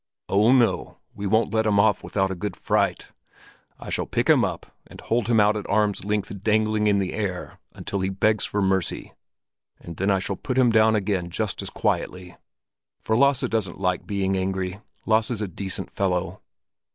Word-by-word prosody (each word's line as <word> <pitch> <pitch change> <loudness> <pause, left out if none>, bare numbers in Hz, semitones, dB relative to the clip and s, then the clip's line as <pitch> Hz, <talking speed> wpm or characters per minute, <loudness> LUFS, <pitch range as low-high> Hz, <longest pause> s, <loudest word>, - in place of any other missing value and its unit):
"Oh, 105 +5 +4
no, 120 -7 +2 0.2
we 100 0 -4
won't 110 +1 +1
let 110 0 +2
him 100 -1 +3
off 105 0 +3
without 95 -1 -1
a - - -3
good 95 +1 -4
fright. - - 0 0.7
I - - -8
shall - - -1
pick - - -1
him - - +5
up - - -4
and - - -13
hold 115 0 -1
him 115 -2 +3
out 105 +1 +4
at 105 - -5
arm's 105 -1 +1
length 105 -1 -3
dangling 110 0 +2
in 100 -1 +3
the 95 -2 -1
air 95 -4 -4
until 100 - -4
he 95 0 -1
begs 105 +3 +1
for 105 -1 -1
mercy; 95 -2 -1 0.7
and 85 -2 -10
then 95 +2 0
I 100 - +3
shall 95 +1 -3
put 130 - -4
him 125 -2 +5
down 110 0 +4
again 95 -4 -1
just 85 - -2
as - - -4
quietly. 90 -1 -2 0.7
For 110 - +1
Lasse 140 +1 +3
doesn't 110 -8 -2
like 90 -2 -1
being 95 -1 0
angry. 95 0 -2 0.3
Lasse's 110 0 +1
a 105 - -2
decent 95 +2 -6
fellow." 95 -1 -2
100 Hz, 190 wpm, -24 LUFS, 95-110 Hz, 0.7 s, him